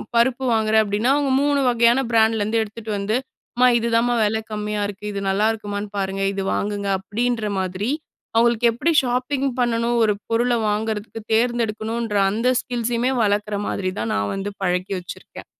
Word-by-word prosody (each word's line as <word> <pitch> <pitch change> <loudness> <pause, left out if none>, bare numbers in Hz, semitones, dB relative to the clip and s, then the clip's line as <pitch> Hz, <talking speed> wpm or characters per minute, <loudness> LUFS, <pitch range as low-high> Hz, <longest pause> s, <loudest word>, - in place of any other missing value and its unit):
பருப்பு 245 +2 +2
வாங்குறேன் 220 0 +3
அப்படின்னா, 210 +5 +1
அவங்க 285 -2 +1
3 285 0 +2
வகையான 235 +1 +4
பிராண்ட்லேருந்து 220 0 +2
எடுத்துட்டு 220 +1 -8
வந்து, 200 +3 -1 0.4
அம்மா 250 +1 +5
இதுதாம்மா 235 +1 +1
விலை 220 +1 0
கம்மியா 210 0 -2
இருக்கு. 205 +1 -8
இது 200 0 -4
நல்லாயிருக்குமான்னு 205 0 -1
பாருங்க, 195 0 -2
இது 195 - -3
வாங்குங்க 205 -1 -2
அப்படின்ற 225 +1 -1
மாதிரி, 185 +4 -2 0.5
அவங்களுக்கு 235 0 +4
எப்படி 330 +8 0
ஷாப்பிங் 255 +2 -1
பண்ணணும் 235 0 +1
ஒரு 215 -1 +3 0.2
பொருளை 240 +1 +2
வாங்குறதுக்கு 215 +1 -3
தேர்ந்தெடுக்கணுன்ற 225 -1 0
அந்த 230 +4 -1
ஸ்கில்ஸுமே 240 +1 -1
வளர்க்குற 205 0 0
மாதிரி 185 -2 -2
தான் 115 - -2
நான் 100 0 -1
வந்து 195 +1 -3
பழக்கி 180 +1 0
வச்சிருக்கேன். 175 - -10
220 Hz, 145 wpm, -22 LUFS, 205-235 Hz, 0.5 s, அம்மா